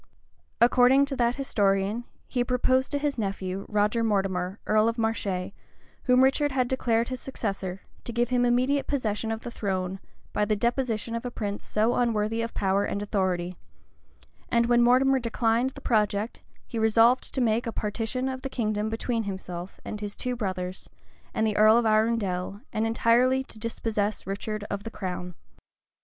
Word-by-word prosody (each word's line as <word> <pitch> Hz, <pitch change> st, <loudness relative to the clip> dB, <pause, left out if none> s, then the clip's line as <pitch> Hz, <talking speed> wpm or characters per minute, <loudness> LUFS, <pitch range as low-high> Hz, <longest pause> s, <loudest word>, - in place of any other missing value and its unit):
According 250 Hz, +3 st, +5 dB
to 280 Hz, -1 st, -4 dB
that 240 Hz, 0 st, +2 dB
historian, 205 Hz, -3 st, 0 dB, 0.2 s
he 245 Hz, -2 st, 0 dB
proposed 255 Hz, +1 st, +1 dB
to 290 Hz, -, +1 dB
his 285 Hz, -3 st, -1 dB
nephew, 195 Hz, -1 st, -3 dB
Roger 210 Hz, +2 st, +1 dB
Mortimer, 195 Hz, -3 st, 0 dB
earl 215 Hz, +1 st, +3 dB
of 230 Hz, -, -4 dB
Marche, 200 Hz, -5 st, -1 dB, 0.5 s
whom 255 Hz, 0 st, +5 dB
Richard 285 Hz, +2 st, +3 dB
had 255 Hz, -2 st, +1 dB
declared 235 Hz, -2 st, +1 dB
his 255 Hz, -1 st, -5 dB
successor, 195 Hz, -7 st, -4 dB, 0.2 s
to -, -, -5 dB
give 240 Hz, +1 st, 0 dB
him 250 Hz, -1 st, +2 dB
immediate 255 Hz, +4 st, +2 dB
possession 225 Hz, -5 st, -1 dB
of 225 Hz, 0 st, -3 dB
the 240 Hz, -, -7 dB
throne, 190 Hz, -3 st, -2 dB, 0.3 s
by -, -, +1 dB
the 210 Hz, +1 st, +1 dB
deposition 235 Hz, 0 st, -1 dB
of 230 Hz, +1 st, -3 dB
a 245 Hz, -, -3 dB
prince 205 Hz, -4 st, -4 dB
so 220 Hz, +3 st, +1 dB
unworthy 225 Hz, -1 st, +1 dB
of 230 Hz, 0 st, -4 dB
power 195 Hz, +1 st, +1 dB
and 200 Hz, 0 st, -2 dB
authority: 185 Hz, -3 st, -1 dB, 0.9 s
and 235 Hz, -1 st, +3 dB
when 240 Hz, 0 st, +4 dB
Mortimer 260 Hz, +2 st, +4 dB
declined 230 Hz, +1 st, +1 dB
the -, -, -12 dB
project, 210 Hz, -1 st, 0 dB, 0.2 s
he 230 Hz, -, -4 dB
resolved 225 Hz, +3 st, +4 dB
to -, -, -2 dB
make 235 Hz, -1 st, +1 dB
a -, -, -1 dB
partition 225 Hz, +5 st, -2 dB
of 260 Hz, -1 st, -4 dB
the 270 Hz, -, -4 dB
kingdom 215 Hz, -4 st, -1 dB
between 225 Hz, 0 st, -2 dB
himself, 185 Hz, -2 st, -6 dB, 0.2 s
his 205 Hz, -1 st, -5 dB
two 250 Hz, 0 st, -2 dB
brothers, 185 Hz, -4 st, -4 dB, 0.4 s
and 220 Hz, -, 0 dB
the 215 Hz, -1 st, 0 dB
earl 215 Hz, +2 st, +7 dB
of 240 Hz, -, +2 dB
Arundel; 215 Hz, -3 st, +1 dB
and 220 Hz, +1 st, +1 dB
entirely 245 Hz, +3 st, +3 dB
to 220 Hz, -, -12 dB
dispossess 215 Hz, -2 st, -2 dB
Richard 205 Hz, +2 st, -4 dB
of 200 Hz, 0 st, -4 dB
the 225 Hz, -, -5 dB
crown. 180 Hz, -4 st, -5 dB
225 Hz, 170 wpm, -27 LUFS, 205-245 Hz, 0.9 s, earl